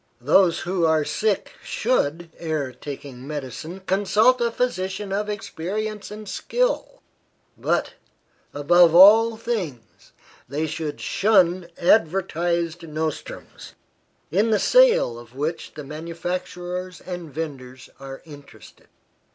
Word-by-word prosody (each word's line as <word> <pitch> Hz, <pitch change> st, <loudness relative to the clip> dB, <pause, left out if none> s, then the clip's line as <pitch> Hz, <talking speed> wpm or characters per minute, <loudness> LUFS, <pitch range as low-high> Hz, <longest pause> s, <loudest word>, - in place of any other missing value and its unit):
Those 165 Hz, +7 st, +3 dB
who 180 Hz, 0 st, -1 dB
are 160 Hz, -2 st, +3 dB
sick 215 Hz, +3 st, -1 dB
should, 170 Hz, -, -1 dB
ere 155 Hz, -5 st, -2 dB
taking 135 Hz, -1 st, -9 dB
medicine, 150 Hz, +5 st, -6 dB
consult 210 Hz, +6 st, +3 dB
a 235 Hz, -, +2 dB
physician 195 Hz, -4 st, -2 dB
of 210 Hz, +1 st, -1 dB
experience 210 Hz, +2 st, -4 dB
and 210 Hz, 0 st, -9 dB
skill; -, -, -2 dB, 0.5 s
but, -, -, -1 dB, 0.6 s
above 165 Hz, +3 st, +4 dB
all 220 Hz, +5 st, +8 dB
things, 190 Hz, -, -5 dB, 0.4 s
they 150 Hz, +4 st, -1 dB
should 155 Hz, -1 st, -4 dB
shun 185 Hz, -4 st, +2 dB
advertised 170 Hz, -2 st, +1 dB
nostrums, 155 Hz, 0 st, -6 dB, 0.6 s
in 205 Hz, +7 st, +2 dB
the 215 Hz, -, +3 dB
sale 475 Hz, -, +4 dB
of 120 Hz, +1 st, -15 dB
which 155 Hz, +4 st, -4 dB
the 150 Hz, -, -7 dB
manufacturers 175 Hz, +3 st, -5 dB
and 175 Hz, -4 st, -7 dB
vendors 130 Hz, -4 st, -7 dB
are 135 Hz, 0 st, -9 dB
interested. 145 Hz, -3 st, -15 dB
175 Hz, 110 wpm, -23 LUFS, 150-205 Hz, 0.6 s, all